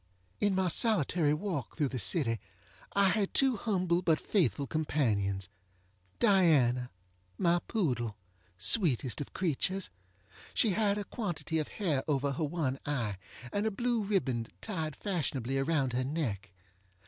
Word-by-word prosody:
In 205 -2 +2
my 190 -1 +1
solitary 170 - +3
walk 165 - -4
through, 145 -4 +1
the 130 - -4
city 115 - +2 0.5
I 200 -1 +4
had 200 0 0
two 270 -2 +4
humble 185 -5 0
but 160 -4 +2
faithful 145 - +1
companions. 105 - 0 0.7
Diana, 150 - +4 0.5
my 175 0 +3
poodle! 120 - -1 0.4
sweetest 130 - +3
of 145 - -6
creatures! 185 - -1 0.6
She 220 - +4
had 205 +1 +1
a 205 - -2
quantity 170 -7 -3
of 155 - -2
hair 160 -10 -1
over 140 -1 +1
her 145 +4 -2
one 145 -4 -1
eye, 120 -9 -2 0.4
and 205 +2 0
a - - +3
blue 235 +2 0
ribbon 135 - 0
tied 160 -8 -4
fashionably 135 - -2
around 135 -3 0
her 125 +1 0
neck. 125 - -3
155 Hz, 135 wpm, -31 LUFS, 130-195 Hz, 0.7 s, I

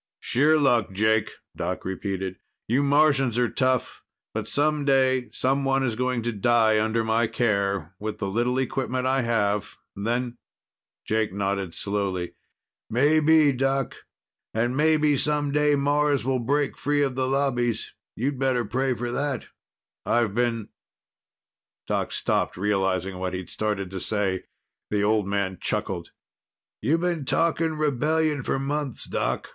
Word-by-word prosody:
"Sheer 150 +5 +3
luck, 120 -9 +2
Jake," 110 +2 +2 0.3
Doc - - -3
repeated. 95 0 -3 0.3
"You 125 +5 +2
Martians 140 -4 +3
are 120 -1 +1
tough. 130 -1 0 0.3
But - - -3
some 150 0 +1
day 130 -2 +2
someone 135 +1 +1
is 120 -4 0
going 125 -1 -1
to 120 - -1
die 110 0 +3
under 110 +1 0
my 110 +1 +2
care, 100 -7 0
with 105 0 -4
the 100 - -3
little 120 +5 0
equipment 130 -1 -1
I 135 +1 +2
have. 105 -4 0 0.2
Then 120 +4 -2 0.3
" - - -68
Jake 110 -2 +1
nodded 100 -2 -2
slowly. 100 -3 -2 0.6
"Maybe, 150 +4 +4
Doc. 135 0 0 0.6
And 120 +3 +1
maybe 150 -1 +3
some 150 -1 0
day 150 0 +3
Mars 145 -1 +1
will 130 -1 +1
break 140 +4 0
free 145 0 +1
of 135 -2 0
the 130 0 -1
Lobbies. 125 -4 0 0.2
You'd 135 +3 -2
better 130 -3 +1
pray 130 +3 0
for 120 +1 -3
that." 140 +1 -2 0.5
"I've 115 -4 +1
been 115 -2 -1 0.6
" - - -68
Doc - - -1
stopped, - - -1
realizing 95 -2 0
what 90 0 -2
he'd 90 -1 -6
started 105 -3 -2
to 95 - -4
say. 100 -2 -1 0.4
The 105 -1 0
old 105 -1 +2
man 100 -2 -1
chuckled. - - -2 0.7
"You've 155 +9 +1
been 175 -4 -1
talking 165 +2 +1
rebellion 150 +1 +1
for 135 - -1
months, 140 0 -2
Doc. - - -2
125 Hz, 145 wpm, -25 LUFS, 105-140 Hz, 0.7 s, Maybe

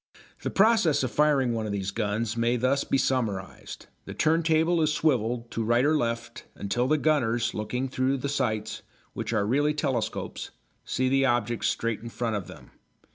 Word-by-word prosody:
The - - -2
process 195 -9 +3
of 130 - -1
firing 140 -5 +2
one 110 -1 -2
of - - -3
these 100 -1 -2
guns 110 +1 -2
may 120 +1 +1
thus 130 +3 +1
be - - 0
summarised. 110 -9 -2 0.2
The - - -8
turntable 160 +1 +2
is 155 -1 +2
swivelled 120 -6 0
to 115 - -2
right 120 +4 +2
or 155 +2 +3
left 120 -2 -3
until 120 +5 -1
the 155 +3 +3
gunners, 120 -7 +1
looking 125 +5 -2
through 130 +1 0
the 130 - -3
sights, 110 -7 -2 0.3
which - - -4
are 110 -3 +1
really 145 +7 +1
telescopes, 125 -6 -3 0.3
see 130 - -1
the 135 +1 +3
object 120 -1 0
straight 115 -2 -1
in 115 +2 -8
front 115 -1 -2
of 100 -5 -4
them. - - -13
120 Hz, 180 wpm, -27 LUFS, 115-140 Hz, 0.3 s, process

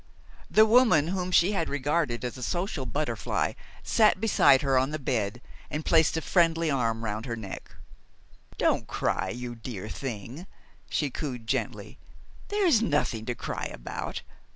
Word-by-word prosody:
The 215 - +6
woman 220 - +5
whom 185 -1 -2
she 180 +1 +4
had 180 -6 -1
regarded 145 -3 -1
as 125 - -4
a 130 - -9
social 175 - -2
butterfly 120 -3 -1 0.3
sat 215 -4 +3
beside 170 -11 +4
her 135 -1 +2
on 130 +1 +3
the 155 - -3
bed 120 -4 -2 0.3
and 150 +1 -4
placed 160 -1 +4
a 160 - -2
friendly 165 -3 +2
arm 115 -4 0
round 110 +3 -3
her 115 - -2
neck. 105 -4 -8 0.8
"Don't - - +1
cry, - - -1
you 120 0 -5
dear 115 -4 -7
thing," 120 - -6 0.4
she 145 -3 -1
cooed 125 -5 -5
gently. 110 - -3 0.5
"There 410 -1 0
is 275 -11 +5
nothing 145 - 0
to 125 - -2
cry - - -4
about. - - -6
140 Hz, 155 wpm, -27 LUFS, 120-170 Hz, 0.8 s, The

